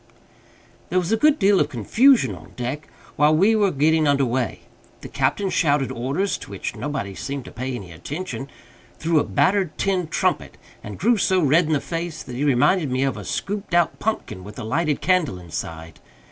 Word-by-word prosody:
There 180 - 0
was 180 +1 0
a - - +5
good 300 +6 +4
deal 195 -3 +4
of - - +1
confusion 230 - +3
on - - -13
deck 130 +5 -4 0.3
while 150 +1 +4
we 200 +7 +4
were 205 -2 +3
getting 155 0 +2
under 140 -1 +3
way. 125 0 -2 0.4
The - - -8
captain 195 -2 0
shouted 145 -4 +1
orders 140 +12 -2
(to - - -11
which 100 -1 -5
nobody 140 -10 -4
seemed 135 +6 -5
to - - -10
pay 130 +2 -4
any 95 -7 -8
attention) 145 - -6 0.5
through 160 -1 +2
a - - +2
battered 190 -4 +1
tin 185 -3 0
trumpet, 155 - -1 0.3
and 105 - -7
grew 230 +4 +3
so 190 -1 +2
red 155 +1 +3
in 160 - +1
the 145 - +2
face 165 +1 -5
that 125 - -8
he 135 - -2
reminded 145 +4 +3
me 130 +1 0
of 135 - 0
a - - -7
scooped 200 -3 -3
out 175 -1 +2
pumpkin 215 - -3
with 105 +2 -11
a - - -5
lighted 150 +6 0
candle 170 - +1
inside. 80 -2 -7
150 Hz, 195 wpm, -22 LUFS, 130-185 Hz, 0.5 s, a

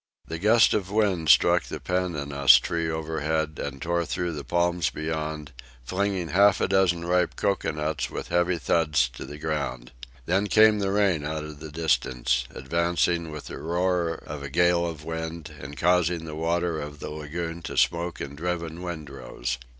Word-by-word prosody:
The 80 0 -5
gust 110 +5 +5
of 100 -3 -1
wind 100 -7 +1
struck - - +5
the - - -6
pandanus 70 -8 +3
tree 85 +6 -2
overhead 80 -1 -2
and 70 -1 -5
tore 85 +2 0
through 90 +1 -2
the 75 -2 -5
palms 85 +3 +1
beyond, 75 -1 -4 0.3
flinging 95 +3 -1
half 100 +2 +5
a - - +1
dozen 95 -3 +2
ripe 90 0 +1
cocoanuts 80 -6 -1
with - - -6
heavy 85 0 +2
thuds 75 -2 +2
to 60 - -9
the 75 - -9
ground. 75 -6 -3 0.3
Then 95 +4 +1
came 110 0 +5
the 100 -1 0
rain 100 -7 +2
out 75 +1 -3
of 75 -1 -9
the 80 - -8
distance, 65 -6 0
advancing 85 +3 0
with 75 -1 -8
the - - -7
roar 85 0 0
of 75 -1 -6
a 70 - -6
gale 85 +2 +3
of 80 -2 -7
wind 80 -1 -5
and 70 +1 -9
causing 85 0 +2
the 80 - -7
water 85 +1 -1
of 75 0 -8
the - - -6
lagoon 80 +3 -5
to - - -6
smoke 85 +1 +1
in 70 0 -6
driven 85 +1 -3
windrows. 70 -7 -5
80 Hz, 170 wpm, -26 LUFS, 75-90 Hz, 0.3 s, gust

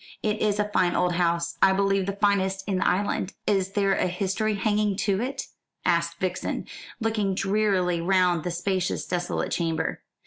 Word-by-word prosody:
It 215 0 0
is 210 -1 +2
a 210 0 +1
fine 180 -3 +2
old 180 - +2
house. 170 -1 0
I 190 - +6
believe 195 0 +1
the 200 - -1
finest 195 -1 +1
in 190 -2 0
the - - +1
island." 190 0 0
"Is 195 -2 +1
there 200 -1 +2
a - - +1
history 195 +4 -1
hanging 210 0 +1
to 200 -1 +1
it?" 265 +2 -3 0.4
asked 170 0 +1
Vixen, 185 0 -2 0.3
looking 215 -4 0
drearily 195 -3 +1
round 180 -2 +2
the 180 - -2
spacious 185 +2 -1
desolate 175 -1 -2
chamber. 165 -2 -1
195 Hz, 170 wpm, -26 LUFS, 180-205 Hz, 0.4 s, I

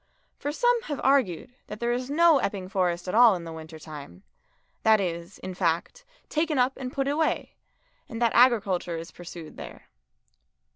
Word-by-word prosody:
For 290 - -2
some 485 +8 +2
have 290 -3 -4
argued 255 - +2
that 210 - -8
there 235 0 0
is 250 +2 -2
no 320 0 +5
Epping 195 -5 -3
Forest 180 -2 -1
at 180 - -3
all 235 -2 +7
in 175 - -6
the 165 -1 -7
winter 160 0 -9
time; 150 - -11 0.6
that 220 -1 +5
it 180 -4 -1
is, 170 +3 -11
in 185 - -7
fact, 180 - -1 0.2
taken 310 -1 0
up 255 +1 +3
and 255 -2 -6
put 275 0 -1
away, 305 +3 0 0.6
and 225 - -6
that 235 -1 +2
agriculture 200 -8 +3
is 165 +1 -8
pursued 170 -2 -10
there. - - -10
215 Hz, 180 wpm, -26 LUFS, 175-270 Hz, 0.6 s, all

